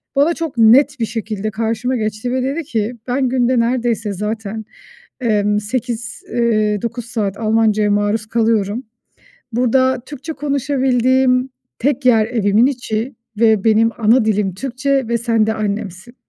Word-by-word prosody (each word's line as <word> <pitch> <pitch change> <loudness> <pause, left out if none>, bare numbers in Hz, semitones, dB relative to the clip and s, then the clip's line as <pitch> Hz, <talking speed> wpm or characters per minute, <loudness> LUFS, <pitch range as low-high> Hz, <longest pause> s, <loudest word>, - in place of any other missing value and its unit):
bana 290 +5 +3
çok 325 -6 -5
net 260 +5 +5
bir 230 - +1
şekilde 215 -1 -4
karşıma 230 +4 -1
geçti 215 +1 -3
ve 255 0 0
dedi 280 +6 -2
ki 230 -3 -2
"Ben 255 +1 0
günde 250 -1 +2
neredeyse 235 -3 0
zaten, 215 +2 -4 0.6
eee, 215 -4 +1 0.2
8, 235 +1 -4
eee, 215 -4 +1
9 235 0 -4
saat 210 -4 -3
Almanca'ya 215 -1 +2
maruz 205 +1 0
kalıyorum. 225 0 0 0.7
Burada 255 +2 +2
Türkçe 295 +3 -7
konuşabildiğim 265 -2 +1 0.3
tek 275 +1 0
yer 225 -4 +5
evimin 220 -1 +2
içi 245 -2 -2 0.3
ve 220 -3 +4
benim 225 0 +4
ana 225 +1 +3
dilim 205 -3 0
Türkçe 265 +4 -1
ve 235 0 +1
sen 230 -2 +1
de 220 - +1
annemsin. 210 +1 -4
230 Hz, 140 wpm, -18 LUFS, 215-255 Hz, 0.7 s, net